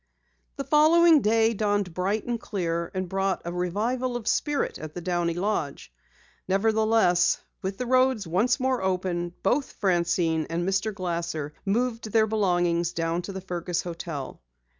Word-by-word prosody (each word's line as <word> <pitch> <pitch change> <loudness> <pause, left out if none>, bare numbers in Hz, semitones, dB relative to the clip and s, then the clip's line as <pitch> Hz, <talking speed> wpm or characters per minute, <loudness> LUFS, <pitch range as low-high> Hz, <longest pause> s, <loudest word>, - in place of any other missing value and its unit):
The - - -4
following 320 +1 +5
day 225 +1 +3
dawned 205 -4 0
bright 195 +5 -1
and 235 -1 -3
clear 170 -4 -2
and 185 0 -2
brought 195 +1 -1
a 170 - -4
revival 225 +8 -1
of 240 -2 -5
spirit 295 -1 0
at 155 -1 -8
the 175 - -5
Downey 175 -1 -1
lodge. 175 - -3 0.5
Nevertheless, 215 -2 +3 0.2
with 190 0 -4
the 250 - -3
roads 255 -3 +2
open 165 - -10
once 240 +9 +2
more, 185 -9 -1
both 275 +2 +1
Francine 170 -4 +1
and 170 +2 -2
Mr. 195 +3 0
Glasser 170 -6 -3
moved 225 +1 -1
their 220 0 +4
belongings 175 -5 +1
down 165 +1 -1
to 195 - -7
the 190 -1 -6
Fergus 175 -1 -3
hotel. 165 - -6
190 Hz, 150 wpm, -26 LUFS, 175-225 Hz, 0.5 s, following